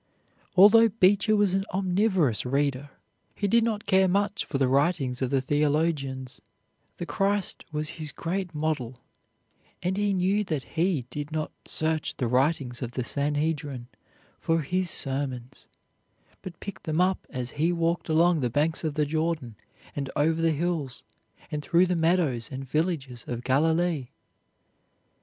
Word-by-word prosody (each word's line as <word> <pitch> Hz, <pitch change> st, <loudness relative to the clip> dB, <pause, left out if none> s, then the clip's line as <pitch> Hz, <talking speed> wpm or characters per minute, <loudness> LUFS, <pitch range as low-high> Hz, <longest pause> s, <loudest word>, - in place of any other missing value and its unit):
Although 220 Hz, +4 st, +8 dB
Beecher 205 Hz, +1 st, +3 dB
was 205 Hz, -3 st, +2 dB
an 195 Hz, 0 st, +1 dB
omnivorous 185 Hz, -, +1 dB
reader 140 Hz, +1 st, -1 dB, 0.5 s
he 205 Hz, -, -1 dB
did 230 Hz, +3 st, +4 dB
not 215 Hz, -2 st, -1 dB
care 190 Hz, -1 st, +4 dB
much 200 Hz, +2 st, 0 dB
for 140 Hz, -, -2 dB
the 135 Hz, -1 st, +2 dB
writings 135 Hz, -2 st, +1 dB
of 130 Hz, -, 0 dB
the 135 Hz, -1 st, +1 dB
theologians; 145 Hz, -2 st, -1 dB, 0.6 s
the 175 Hz, -, -4 dB
Christ 195 Hz, +5 st, -1 dB
was 150 Hz, 0 st, -2 dB
his 150 Hz, -2 st, -2 dB
great 175 Hz, +2 st, -4 dB
model, 145 Hz, -6 st, -2 dB, 0.8 s
and 185 Hz, +2 st, -1 dB
he 205 Hz, -1 st, +1 dB
knew 190 Hz, +3 st, +2 dB
that 155 Hz, -7 st, -2 dB
He 165 Hz, -6 st, +1 dB
did 150 Hz, 0 st, -5 dB
not 155 Hz, 0 st, -2 dB
search 155 Hz, -1 st, -2 dB
the 125 Hz, -, -1 dB
writings 130 Hz, 0 st, 0 dB
of 125 Hz, -1 st, -4 dB
the 125 Hz, -, -2 dB
Sanhedrin 145 Hz, -2 st, -2 dB, 0.5 s
for 165 Hz, 0 st, +1 dB
His 180 Hz, +5 st, -1 dB
sermons, 130 Hz, -3 st, -3 dB, 0.7 s
but 175 Hz, -3 st, -9 dB
picked 195 Hz, -2 st, -8 dB
them 155 Hz, +1 st, -1 dB
up 185 Hz, +1 st, +1 dB
as 125 Hz, -1 st, -4 dB
He 160 Hz, +4 st, +1 dB
walked 170 Hz, 0 st, -1 dB
along 165 Hz, +1 st, +4 dB
the 125 Hz, -3 st, 0 dB
banks 150 Hz, +7 st, 0 dB
of 155 Hz, -3 st, -2 dB
the 150 Hz, -1 st, +2 dB
Jordan 155 Hz, -6 st, -2 dB, 0.4 s
and 140 Hz, -2 st, -3 dB
over 160 Hz, +2 st, +2 dB
the 165 Hz, -, +3 dB
hills 155 Hz, -4 st, -2 dB, 0.5 s
and 150 Hz, -, -2 dB
through 175 Hz, +4 st, +4 dB
the 180 Hz, 0 st, 0 dB
meadows 160 Hz, -9 st, +1 dB
and 135 Hz, 0 st, -6 dB
villages 145 Hz, -6 st, -2 dB
of 120 Hz, 0 st, -4 dB
Galilee. 160 Hz, +2 st, +1 dB
155 Hz, 150 wpm, -27 LUFS, 135-180 Hz, 0.8 s, Although